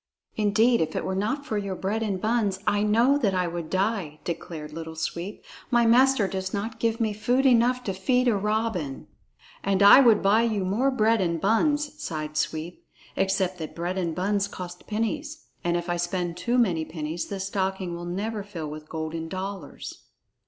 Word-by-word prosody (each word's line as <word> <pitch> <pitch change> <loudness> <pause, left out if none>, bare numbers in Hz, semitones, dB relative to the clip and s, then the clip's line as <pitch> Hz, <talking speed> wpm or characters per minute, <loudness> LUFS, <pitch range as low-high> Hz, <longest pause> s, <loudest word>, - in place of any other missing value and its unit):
"Indeed, 220 +3 +3
if 160 - -1
it - - -2
were 190 - -1
not 220 +9 -1
for 215 -7 -1
your 200 -2 -3
bread 200 +4 -2
and 200 -4 -1
buns, 215 -2 +1
I 205 - +2
know 230 +7 +3
that 200 -8 +1
I 180 -1 +1
would 170 -2 -4
die," 190 -6 -1
declared 160 -3 -6
Little 160 0 -7
Sweep. 170 +4 -4 0.3
"My 240 -2 +4
master 245 -2 +5
does 190 0 -3
not 220 +3 -4
give 230 0 0
me 220 -2 +1
food 245 +6 +1
enough 250 0 +4
to 195 - -2
feed 250 +7 +1
a 235 - +4
robin." 210 -8 -1 0.6
"And 195 0 +2
I 200 - +10
would 230 -5 +5
buy 205 +3 +5
you 215 -5 0
more 225 +9 +2
bread 225 -4 +2
and 170 -2 0
buns," 295 - +1
sighed 155 -1 -4
Sweep, 160 +3 -3 0.3
"except 190 -1 0
that 155 - -6
bread 175 +3 -2
and 170 -3 -2
buns 200 +2 0
cost 180 -2 -9
pennies, 290 +8 -3 0.2
and 175 0 +1
if 175 +1 -4
I 175 0 0
spend 175 0 -2
too 240 +6 0
many 180 -10 +2
pennies, 160 +1 -4
the 200 - -5
stocking 190 -2 -2
will 170 0 -6
never 205 +5 -3
fill 170 -7 -6
with 155 0 -9
golden 160 +1 -4
dollars." 190 -2 -7
195 Hz, 190 wpm, -26 LUFS, 175-225 Hz, 0.6 s, I